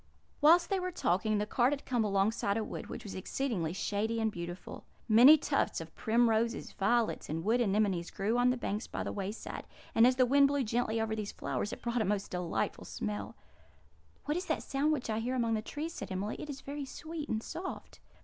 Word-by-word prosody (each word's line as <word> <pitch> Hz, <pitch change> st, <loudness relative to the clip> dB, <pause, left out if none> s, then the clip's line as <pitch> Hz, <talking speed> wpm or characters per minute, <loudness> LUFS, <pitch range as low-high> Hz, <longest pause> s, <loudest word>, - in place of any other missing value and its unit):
Whilst 340 Hz, +4 st, +6 dB
they 390 Hz, -, +2 dB
were 365 Hz, 0 st, -2 dB
talking, 215 Hz, -, +1 dB
the 210 Hz, -, 0 dB
cart 245 Hz, +4 st, +2 dB
had 285 Hz, -, -5 dB
come 245 Hz, -3 st, +1 dB
alongside 200 Hz, 0 st, +1 dB
a 225 Hz, -, 0 dB
wood, -, -, -6 dB
which -, -, -7 dB
was 200 Hz, -, -7 dB
exceedingly 190 Hz, -4 st, -2 dB
shady 210 Hz, +4 st, -1 dB
and 220 Hz, -1 st, +1 dB
beautiful. 175 Hz, -1 st, -7 dB, 0.2 s
Many 245 Hz, +8 st, +9 dB
tufts -, -, 0 dB
of -, -, -9 dB
primroses, 230 Hz, 0 st, +1 dB
violets, 230 Hz, +3 st, 0 dB
and 160 Hz, +2 st, -2 dB
wood 230 Hz, +5 st, +2 dB
anemones 195 Hz, -5 st, +1 dB
grew 210 Hz, +4 st, -1 dB
on 245 Hz, +1 st, +4 dB
the 250 Hz, -, +1 dB
banks 215 Hz, -2 st, -3 dB
by -, -, -4 dB
the -, -, -3 dB
wayside; 200 Hz, +2 st, -5 dB, 0.3 s
and 225 Hz, +2 st, +6 dB
as 255 Hz, -, +3 dB
the 255 Hz, 0 st, +4 dB
wind 280 Hz, +2 st, +5 dB
blew 285 Hz, -1 st, +1 dB
gently 230 Hz, 0 st, 0 dB
over 220 Hz, 0 st, -1 dB
these 210 Hz, -2 st, -4 dB
flowers, 205 Hz, -, -3 dB
it -, -, -8 dB
brought 235 Hz, 0 st, 0 dB
a -, -, +1 dB
most 200 Hz, 0 st, -1 dB
delightful 180 Hz, -2 st, -2 dB
smell. 210 Hz, 0 st, -4 dB, 0.9 s
"What 295 Hz, -, 0 dB
sound -, -, -1 dB
is -, -, -12 dB
that 275 Hz, +1 st, 0 dB
which 305 Hz, -4 st, +1 dB
I 215 Hz, -, 0 dB
hear 245 Hz, +3 st, -2 dB
among 230 Hz, -2 st, +1 dB
the 215 Hz, -, 0 dB
trees?" 305 Hz, +8 st, -5 dB
said -, -, -7 dB
Emily. 195 Hz, +3 st, -2 dB
"It 300 Hz, -, -7 dB
is 275 Hz, -1 st, -6 dB
very 285 Hz, +1 st, -5 dB
sweet 315 Hz, +2 st, -7 dB
and 220 Hz, 0 st, -1 dB
soft." 355 Hz, +3 st, -7 dB
225 Hz, 215 wpm, -32 LUFS, 205-265 Hz, 0.9 s, Many